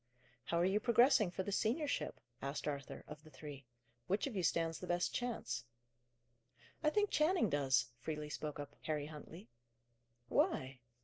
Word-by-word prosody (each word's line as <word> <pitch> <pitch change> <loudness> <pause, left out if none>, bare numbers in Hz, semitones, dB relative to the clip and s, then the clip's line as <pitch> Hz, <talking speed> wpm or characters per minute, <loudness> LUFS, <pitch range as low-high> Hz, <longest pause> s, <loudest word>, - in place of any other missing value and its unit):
"How 170 - 0
are 175 - +4
you 195 +3 +3
progressing 235 -2 +5
for 185 +1 -3
the 200 - -3
seniorship?" 270 +9 0 0.2
asked 140 +3 -3
Arthur, 140 -1 -4
of 150 0 -9
the 155 - -13
three. 145 -4 -9 0.4
"Which 195 +3 +1
of 270 -6 -4
you 190 - +1
stands 165 -1 +1
the 180 - -6
best 175 0 +1
chance?" 220 - -2 1.2
"I 305 - +5
think 415 +5 +2
Channing 305 - +3
does," 130 -4 +3
freely 150 +2 -4
spoke 150 -1 -4
up 145 - -6
Harry 150 -2 -1
Huntley. 155 +2 -9 0.8
"Why?" 130 +1 +1
165 Hz, 160 wpm, -37 LUFS, 145-215 Hz, 1.2 s, progressing